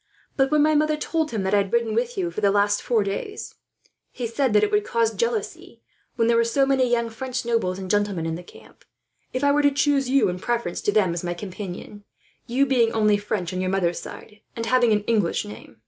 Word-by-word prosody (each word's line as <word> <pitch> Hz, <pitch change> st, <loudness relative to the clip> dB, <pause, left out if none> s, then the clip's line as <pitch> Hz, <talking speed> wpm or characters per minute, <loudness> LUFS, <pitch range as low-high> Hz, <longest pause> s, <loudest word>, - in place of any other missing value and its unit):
But 270 Hz, -1 st, +2 dB
when 300 Hz, -1 st, +3 dB
my 310 Hz, 0 st, +3 dB
mother 305 Hz, 0 st, +2 dB
told 315 Hz, 0 st, -1 dB
him 215 Hz, -7 st, -3 dB
that 190 Hz, +1 st, -1 dB
I -, -, +5 dB
had 200 Hz, -1 st, 0 dB
ridden 235 Hz, -2 st, +1 dB
with 240 Hz, +2 st, -1 dB
you 175 Hz, -3 st, -1 dB
for 190 Hz, -, -5 dB
the 200 Hz, -, +4 dB
last 205 Hz, +1 st, +2 dB
four 230 Hz, -4 st, +1 dB
days, 200 Hz, -, -5 dB, 0.6 s
he 245 Hz, -, -5 dB
said 245 Hz, +3 st, 0 dB
that 210 Hz, -, +4 dB
it 415 Hz, -, +1 dB
would 420 Hz, 0 st, +2 dB
cause 230 Hz, -, 0 dB
jealousy, 465 Hz, -2 st, -3 dB, 0.3 s
when 230 Hz, -, +1 dB
there 235 Hz, 0 st, +3 dB
were 230 Hz, -, +4 dB
so 270 Hz, +4 st, +2 dB
many 265 Hz, -2 st, +2 dB
young 235 Hz, -1 st, +1 dB
French 255 Hz, +2 st, -4 dB
nobles 225 Hz, -6 st, 0 dB
and 190 Hz, -1 st, -6 dB
gentlemen 205 Hz, -4 st, 0 dB
in 165 Hz, -, -2 dB
the 170 Hz, -, -5 dB
camp, 175 Hz, -, -17 dB, 0.5 s
if 255 Hz, +2 st, -3 dB
I 285 Hz, -, +4 dB
were 295 Hz, +1 st, +3 dB
to 285 Hz, -, +5 dB
choose 275 Hz, -1 st, +1 dB
you 275 Hz, +1 st, +3 dB
in 180 Hz, 0 st, -3 dB
preference 235 Hz, -5 st, -2 dB
to -, -, +1 dB
them 195 Hz, -5 st, +2 dB
as 170 Hz, -, -4 dB
my 175 Hz, 0 st, -3 dB
companion; 195 Hz, +2 st, -8 dB, 0.4 s
you 260 Hz, +3 st, +2 dB
being 245 Hz, -4 st, +2 dB
only 210 Hz, -2 st, +3 dB
French 205 Hz, -3 st, -3 dB
on 185 Hz, -, -2 dB
your 185 Hz, -, -1 dB
mother's 180 Hz, -3 st, 0 dB
side, 210 Hz, -1 st, -11 dB, 0.2 s
and 230 Hz, -, -3 dB
having 245 Hz, -1 st, +3 dB
an 210 Hz, -1 st, +2 dB
English 210 Hz, -6 st, 0 dB
name. 110 Hz, +2 st, -11 dB
225 Hz, 240 wpm, -23 LUFS, 195-265 Hz, 0.6 s, I